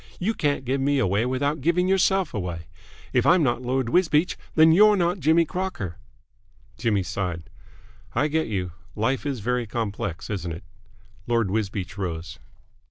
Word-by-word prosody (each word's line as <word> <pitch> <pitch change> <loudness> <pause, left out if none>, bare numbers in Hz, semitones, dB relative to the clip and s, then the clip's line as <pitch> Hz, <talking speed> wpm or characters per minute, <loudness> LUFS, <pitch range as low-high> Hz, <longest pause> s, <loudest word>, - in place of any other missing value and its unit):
You 210 +5 0
can't 145 -7 -1
give 135 +2 0
me 140 +1 +2
away 110 -1 +1
without 140 +3 -1
giving 170 +5 +2
yourself 190 -2 +2
away. 90 -5 -4 0.5
If - - +2
I'm 175 -1 +5
not 120 -2 +1
Lord 130 -1 -1
Wisbeach, 160 +1 +2 0.2
then 160 0 +7
you're 210 +5 +6
not 175 0 +1
Jimmy 165 +2 +4
Crocker." 180 - -4 0.8
Jimmy 105 -4 0
sighed. 90 -3 -4 0.6
"I 140 +6 +2
get 160 +1 0
you. 90 -4 -3 0.2
Life 130 +6 0
is 135 -6 -3
very 125 +1 -1
complex, 105 -5 -4
isn't 90 -5 -3
it?" 85 - -9 0.6
Lord 115 -5 +1
Wisbeach 100 -2 -3
rose. 85 -2 -4
125 Hz, 155 wpm, -24 LUFS, 100-160 Hz, 0.8 s, then